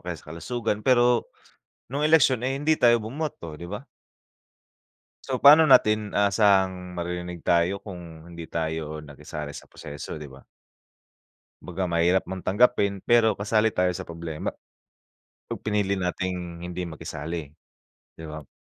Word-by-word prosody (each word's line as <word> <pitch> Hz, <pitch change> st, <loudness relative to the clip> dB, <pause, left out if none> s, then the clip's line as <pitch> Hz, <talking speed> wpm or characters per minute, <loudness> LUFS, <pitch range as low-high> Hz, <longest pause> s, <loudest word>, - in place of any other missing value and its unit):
kaya -, -, -5 dB
sa 75 Hz, -, -12 dB
kalusugan 110 Hz, +4 st, -3 dB
pero, 120 Hz, 0 st, +3 dB, 0.6 s
nung 145 Hz, +3 st, +1 dB
eleksyon 135 Hz, -6 st, +5 dB
ay 135 Hz, -, -1 dB
hindi 150 Hz, +3 st, +1 dB
tayo 120 Hz, -2 st, +4 dB
bumoto 110 Hz, -, -5 dB
'di 85 Hz, -, -7 dB
ba? 105 Hz, +7 st, -6 dB, 1.4 s
So 130 Hz, -2 st, -3 dB
pa'no 150 Hz, +3 st, +9 dB
natin 110 Hz, -7 st, +4 dB
aasahang 95 Hz, -3 st, +2 dB
maririnig 90 Hz, 0 st, -4 dB
tayo 85 Hz, +4 st, +1 dB
kung 85 Hz, -4 st, -10 dB
hindi 85 Hz, -1 st, -8 dB
tayo 80 Hz, -1 st, -3 dB
nakisali 75 Hz, 0 st, -8 dB
sa -, -, -10 dB
proseso 75 Hz, +1 st, -8 dB
'di 75 Hz, -, -8 dB
ba? 65 Hz, 0 st, -14 dB, 1.2 s
Kumbaga 90 Hz, +1 st, -4 dB
mahirap 85 Hz, +2 st, +2 dB
mong 95 Hz, 0 st, -6 dB
tanggapin 100 Hz, -2 st, +2 dB
pero 115 Hz, 0 st, +4 dB
kasali 110 Hz, +2 st, +1 dB
tayo 90 Hz, 0 st, +2 dB
sa -, -, -6 dB
problema 85 Hz, -2 st, -5 dB, 1.0 s
yung -, -, -4 dB
pinili 105 Hz, -2 st, 0 dB
nating 90 Hz, -1 st, -3 dB
hindi 90 Hz, 0 st, -4 dB
makisali 80 Hz, -1 st, -6 dB, 0.6 s
'di 80 Hz, -, -10 dB
ba? 75 Hz, -2 st, -8 dB
95 Hz, 135 wpm, -25 LUFS, 85-110 Hz, 1.4 s, pa'no